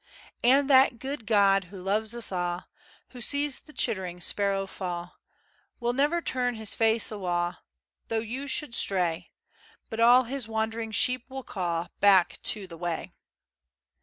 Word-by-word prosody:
And 270 +3 +4
that 265 -3 +5
guid 265 -2 -6
God 200 -3 +4
who 190 +2 -11
loves 210 +4 0
us 235 -3 +1
a', 175 -1 -3 0.4
Who 250 - -11
sees 285 +3 -1
the 305 - -16
chittering[C] 185 -10 -1
sparrow 200 -1 0
fa', 175 -2 -6 0.7
Will 240 0 -1
never 295 +6 +1
turn 250 -1 0
his 220 -2 -2
face 225 0 +2
awa', 175 -4 -2 0.5
Though 225 - -1
you 240 +6 -4
should 280 -2 0
stray; 180 -7 +2 0.6
But 220 - -5
all 245 +2 +6
his 255 -1 -4
wandering 225 0 -3
sheep 250 +3 +1
will 265 0 -7
ca' 175 -5 -3
Back 195 -3 +4
to 210 -2 +1
the 170 -3 -11
way. 170 -2 -4
220 Hz, 150 wpm, -27 LUFS, 185-250 Hz, 0.7 s, all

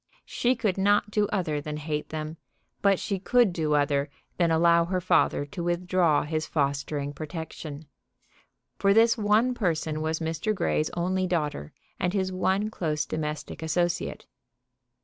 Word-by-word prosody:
She 250 +1 +1
could 210 -5 -1
not 205 +1 +3
do 210 -1 +2
other 165 -8 -1
than 150 +1 -5
hate 150 0 -3
them, 155 +1 -5 0.4
but 195 -2 +3
she 195 -2 -2
could 235 0 +3
do 155 -3 0
other 145 0 +1 0.3
than 170 -2 +3
allow 170 +1 +4
her 185 +1 -1
father 170 -4 +2
to 170 +4 -6
withdraw 175 -2 +2
his 155 +1 -2
fostering 140 0 -1
protection; 155 -1 -7 0.9
for 200 0 +4
this 230 +1 +5
one 220 +3 +2
person 160 -8 -1
was 160 0 -1
Mr. 165 +7 -1
Grey's 155 -4 0
only 185 +2 0
daughter 150 - -2 0.3
and 180 +1 0
his 190 -2 0
one 190 +3 0
close 155 -6 -1
domestic 150 0 -4
associate. 175 +2 -1
170 Hz, 150 wpm, -27 LUFS, 155-190 Hz, 0.9 s, this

